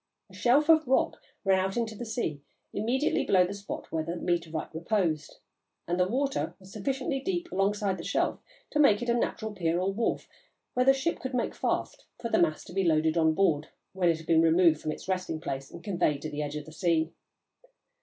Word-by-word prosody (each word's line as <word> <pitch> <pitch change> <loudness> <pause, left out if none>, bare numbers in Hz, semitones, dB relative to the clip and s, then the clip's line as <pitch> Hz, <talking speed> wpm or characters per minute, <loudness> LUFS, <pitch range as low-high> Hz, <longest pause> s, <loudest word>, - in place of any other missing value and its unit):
A - - -17
shelf 275 +5 +3
of 315 -3 +5
rock 265 - +1 0.2
ran 190 -1 +4
out 190 +2 -1
into 230 -2 -1
the 235 +2 -7
sea 160 - -2 0.3
immediately 245 +8 +1
below 185 -2 +4
the 190 - -4
spot 200 0 -7
where 160 -1 -1
the 165 +2 -4
meteorite 170 -3 -2
reposed, 165 -2 -1 0.5
and 175 +2 -1
the 180 - +3
water 270 +6 -1
was 190 0 -14
sufficiently 270 +6 -2
deep 350 +3 -3
alongside 195 -1 0
the - - -6
shelf 200 - 0 0.3
to 300 - 0
make 235 -6 +5
it 240 - -3
a - - +4
natural 220 -2 -1
pier 170 -3 0
or 190 +2 0
wharf 230 +3 -1 0.5
where 250 +1 +1
the 270 - +8
ship 275 +5 -1
could 260 -1 -4
make 245 - 0
fast - - -2
for 230 - -3
the - - +3
mass 155 -3 +1
to - - -12
be 195 +1 +1
loaded 160 -1 +2
on 160 -1 +3
board, 155 -6 +2 0.3
when 185 -2 +2
it 165 - +2
had 160 - -11
been 165 0 +4
moved 165 -1 +4
from 155 - -2
its - - -8
resting 185 -4 -2
place 135 -4 -5
and 170 - -11
conveyed 175 -7 0
to 155 - -4
the 150 0 -3
edge 145 0 -3
of 150 - -5
the 160 - -11
sea. 165 -1 +1
185 Hz, 215 wpm, -29 LUFS, 160-235 Hz, 0.5 s, the